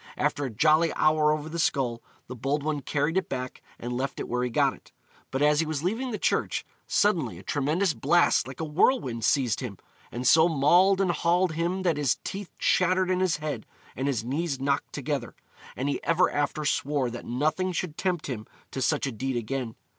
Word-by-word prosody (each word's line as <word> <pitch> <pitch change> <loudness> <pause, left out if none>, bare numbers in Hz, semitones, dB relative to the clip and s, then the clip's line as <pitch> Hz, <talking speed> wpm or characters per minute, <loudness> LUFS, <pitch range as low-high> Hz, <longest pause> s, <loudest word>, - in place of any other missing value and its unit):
After 145 - 0
a - - -3
jolly 155 +8 +3
hour 155 0 +3
over 155 0 -2
the 170 +2 -5
skull, 125 -7 0 0.2
the 125 - -8
bold 140 +4 -1
one 150 -1 -1
carried 150 +5 0
it 190 - -1
back 125 -1 -5 0.2
and 120 +1 -5
left 135 +2 -3
it - - -4
where 125 +1 -1
he 125 - -1
got 115 - +2
it; - - -18 0.4
but 135 +2 -1
as 150 0 +4
he 165 - +2
was 155 -1 -3
leaving 225 +8 -1
the 220 - -3
church, - - 0 0.2
suddenly 165 - +1
a 95 - -12
tremendous 155 - 0
blast 170 +2 +3
like 130 -1 -9
a - - -2
whirlwind 150 - +1
seized 130 -1 +2
him, 120 -7 -6 0.3
and 125 +1 -2
so 160 +2 +6
mauled 175 +6 +4
and 185 -2 +2
hauled 175 +1 +2
him 170 +4 -1
that 170 -5 +1
his 140 -6 +1
teeth 195 -1 -5
chattered 185 0 +2
in 185 - +1
his 185 -3 +1
head 150 -7 -5 0.3
and 135 +2 -2
his 125 -6 0
knees 140 +3 -2
knocked 140 +1 -1
together, 140 -4 -3 0.4
and 130 - -2
he 145 - -2
ever 170 +2 +3
after 145 +1 -1
swore 140 -3 0
that 120 - -7
nothing 155 +9 0
should 175 -3 -3
tempt 180 -3 -1
him 115 -5 -5 0.2
to 135 - -4
such 145 +3 +1
a 135 - -2
deed 130 +3 -3
again. 120 0 -3
150 Hz, 205 wpm, -27 LUFS, 130-170 Hz, 0.4 s, so